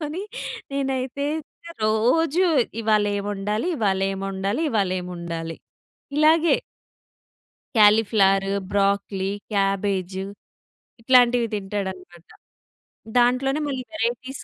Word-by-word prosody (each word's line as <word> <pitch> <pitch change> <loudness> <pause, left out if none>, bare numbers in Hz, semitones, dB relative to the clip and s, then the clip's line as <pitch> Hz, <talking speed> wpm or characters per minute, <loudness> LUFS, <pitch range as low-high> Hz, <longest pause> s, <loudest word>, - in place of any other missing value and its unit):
చించుకొని 315 +5 -4 0.5
నేనైతే 270 0 -2 0.6
రోజు 255 +11 +2 0.4
ఇవాళ 215 -1 +2
ఏం 200 - -3
వండాలి, 210 - -2
ఇవాళ 195 -5 +1
ఏం 195 - -5
ఒండాలి, 195 +8 -2
ఇవాళ 200 -5 +1
ఏం 180 - -8
ఒండాలి, 165 -1 -5 0.6
ఇలాగే. 320 +2 +5 1.2
కాలీఫ్లవర్, 205 -2 +4 0.2
బ్రోకలి, 200 -1 0 0.2
క్యాబేజ్ 195 -2 0 0.9
ఇట్లాంటివి 245 -1 +4
తింటాడన్నమాట. 190 -4 -6 0.9
దాంట్లోనే 255 +4 +2
మళ్ళీ 260 -2 -3
వెరైటీస్ 255 -1 -3
215 Hz, 85 wpm, -23 LUFS, 195-255 Hz, 1.2 s, ఇలాగే